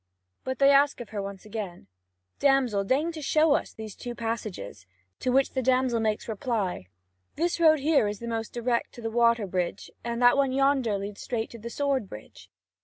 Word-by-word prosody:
But 260 0 -3
they 275 0 +6
ask 280 +1 +4
of 240 - -8
her 205 -2 -4
once 195 0 -7
again: 205 - -6 0.5
"Damsel, 265 -8 +3
deign 280 +11 +1
to 320 -2 -8
show 305 +1 +3
us - - -1
these 220 -2 -9
two 240 -1 -7
passages." 215 - -5 0.3
To 255 - 0
which 270 +1 +3
the 260 - -1
damsel 255 -1 +2
makes 215 -1 -1
reply: 210 - -2 0.5
"This 340 +2 0
road 315 -2 +6
here 290 -6 +3
is 205 0 -3
the 235 - -7
most 225 -1 -3
direct 240 0 -1
to 240 - -10
the 225 - -2
water 235 -1 +3
bridge, 180 0 -3
and 235 0 -3
that 245 +2 +5
one 275 -2 +2
yonder 270 -6 +2
leads 200 +1 -6
straight 230 -2 -3
to 235 - -10
the 235 +2 -7
sword 270 -5 -1
bridge." 100 -3 -12
235 Hz, 195 wpm, -27 LUFS, 210-270 Hz, 0.5 s, they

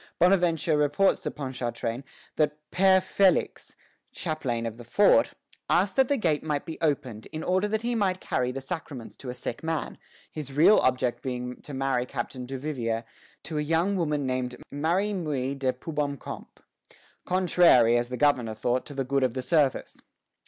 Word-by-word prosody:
Bonaventure 175 -3 +3
reports 150 +7 +2
to - - -3
Ponchartrain 125 -3 -4 0.3
that 150 -1 +1
Père 190 0 +5
Félix, 190 0 +1 0.4
chaplain 130 -9 -3
of 115 0 -5
the 120 - -10
fort, 205 - +4 0.4
asked 190 +3 +2
that 265 -1 +4
the 285 - +1
gate 160 - 0
might 150 -2 -2
be 160 - -7
opened, 140 -8 -1
in 155 +1 -6
order 185 +3 +1
that 220 +1 -2
he 240 +1 0
might 195 -5 0
carry 125 -7 -1
the 135 +1 -5
sacraments 135 -5 -6
to 130 - -9
a 125 - -5
sick 125 -1 -5
man, 160 -1 -3 0.3
his 145 -3 -7
real 160 +9 +6
object 125 -1 +1
being 125 -1 -5
to 145 - -8
marry 130 -2 0
Captain 125 0 -5
Duvivier 130 -4 -3 0.4
to 155 -2 -3
a - - +1
young 165 +6 +1
woman 150 -5 0
named 130 -1 -2 0.2
Marie 175 +8 0
Muis 140 -7 -2
de 130 -1 +1
Poubomcoup, 145 -2 -5 0.8
contrary, 175 -10 +4
as 120 0 0
the 125 - -4
governor 125 -6 +2
thought, 120 +3 -1
to 145 - -9
the 135 - -1
good 135 +1 0
of 130 -2 0
the 130 - -3
service. 150 -5 0
145 Hz, 170 wpm, -27 LUFS, 125-170 Hz, 0.8 s, real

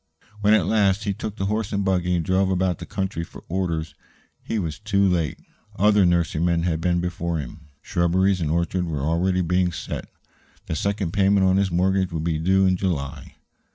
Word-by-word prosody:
When, 105 +1 +4
at 110 - +2
last, 100 -2 +2
he 100 - -1
took 105 +1 -6
the 95 - -2
horse 105 +1 -1
and 100 -2 -1
buggy 90 -2 +1
and 85 -2 -1
drove 95 +2 +2
about 90 -2 0
the - - -8
country 95 -4 -3
for - - -12
orders, 85 -4 -2 0.5
he 115 - -3
was 85 -5 -3
too 100 -2 +2
late. 85 -6 0 0.4
Other 105 -1 +4
nurserymen 85 0 +1
had 80 -2 -1
been 85 0 +1
before 85 -1 -2
him; 75 +2 -8 0.2
shrubberies 90 +2 +1
and 80 - -1
orchards 85 +2 0
were 75 -4 -3
already 90 +4 +1
being 90 +1 +1
set - - -5
out. - - -30 0.6
The - - -3
second 100 0 -1
payment 100 0 +3
on 95 0 +3
his 100 -1 +2
mortgage 95 +1 +1
would 80 -2 -3
be 80 -2 -1
due 95 +4 +3
in 95 -1 +2
July. 75 -7 -3
90 Hz, 195 wpm, -23 LUFS, 85-95 Hz, 0.6 s, When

